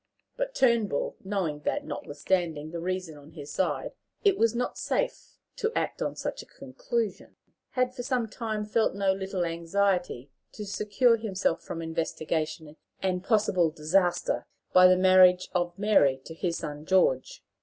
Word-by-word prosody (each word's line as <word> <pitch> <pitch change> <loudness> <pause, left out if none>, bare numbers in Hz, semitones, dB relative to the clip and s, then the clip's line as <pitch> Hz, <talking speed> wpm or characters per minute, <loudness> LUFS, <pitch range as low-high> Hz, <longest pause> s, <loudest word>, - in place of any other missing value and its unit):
But - - -3
Turnbull, 230 - +2
knowing 190 -7 -2
that, - - -2
notwithstanding 155 +1 -2
the 170 - -4
reason 180 -3 -4
on 145 +3 -16
his 145 -3 -9
side, 190 - -1 0.3
it 400 -3 +5
was 230 - +2
not 250 +1 -2
safe - - -2 0.2
to 445 - 0
act - - -2
on - - -2
such - - -4
a - - -15
conclusion, 485 -2 -4 0.4
had 255 -1 +1
for 255 - -5
some 250 -2 -1
time 215 -1 -4
felt 220 -1 +1
no 195 -1 +2
little 190 -2 -2
anxiety 170 -4 -1 0.2
to 210 - -7
secure 210 +4 +2
himself 195 -6 -1
from 165 - -6
investigation 160 -1 -3 0.3
and 185 -1 0
possible 195 -6 +2
disaster 170 +4 0 0.3
by 185 0 +8
the 185 0 +5
marriage 185 -1 +6
of 175 -1 -1
Mary 195 -11 +3
to 160 - -8
his 170 0 -2
son 150 -1 -6
George. 160 -8 +1
185 Hz, 155 wpm, -28 LUFS, 165-215 Hz, 0.4 s, by